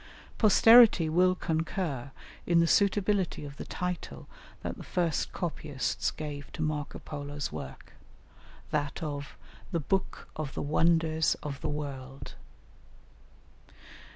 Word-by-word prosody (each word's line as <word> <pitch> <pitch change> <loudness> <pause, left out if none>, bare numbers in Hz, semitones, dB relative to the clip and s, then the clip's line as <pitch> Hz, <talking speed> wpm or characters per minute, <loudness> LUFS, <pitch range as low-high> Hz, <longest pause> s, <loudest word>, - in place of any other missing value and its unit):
Posterity 220 -5 +7
will 180 +3 +4
concur 160 -5 -2 0.4
in 170 -1 +4
the 170 - +5
suitability 200 -1 +2
of 140 -1 -9
the - - -6
title 180 0 -5 0.4
that - - -3
the - - -9
first 170 -4 -1
copyists 150 -6 -2
gave 145 -2 -7
to 160 - -3
Marco 150 -1 -2
Polo's 145 -1 -5
work, 70 -4 -8 0.8
that 145 +1 -2
of 145 -2 -5 0.3
"The 170 - 0
Book 190 +6 -2
of 155 -3 -5
the - - -2
Wonders 160 +1 +2
of 140 -2 -5
the - - -2
World." 135 -3 -6
155 Hz, 120 wpm, -29 LUFS, 145-180 Hz, 0.8 s, Posterity